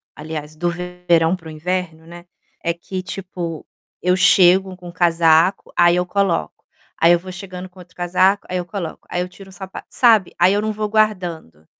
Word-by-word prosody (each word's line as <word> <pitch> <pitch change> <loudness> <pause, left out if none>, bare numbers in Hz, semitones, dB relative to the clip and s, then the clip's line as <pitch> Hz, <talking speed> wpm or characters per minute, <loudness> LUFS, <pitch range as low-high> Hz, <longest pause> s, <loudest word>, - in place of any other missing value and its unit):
aliás, 155 0 -7
do 175 +2 -1
verão 180 -1 0
para 165 -3 -13
o - - -8
inverno, 165 0 -4
né, 175 0 -12 0.4
é 170 - 0
que, 185 +2 -6
tipo, 180 -4 -6 0.4
eu 180 +1 +2
chego 185 0 +4
com 175 -1 -10
casaco, 170 +1 +3
aí 175 0 +5
eu 180 - 0
coloco, 180 - -1 0.4
aí 165 +1 +6
eu 175 - +4
vou 185 +1 -9
chegando 185 0 -8
com 185 0 -19
outro 180 0 -15
casaco, 185 +3 +1
aí 185 - -2
eu 180 - -3
coloco, 175 -2 -6
aí 175 - -2
eu 180 - -3
tiro 190 +1 -14
o - - -14
sapa 190 +1 -9
sabe? 225 -7 +3
Aí 180 +3 +5
eu 205 - +1
não 215 0 -1
vou 215 0 -3
guardando. 180 - -1
180 Hz, 195 wpm, -20 LUFS, 170-190 Hz, 0.4 s, aí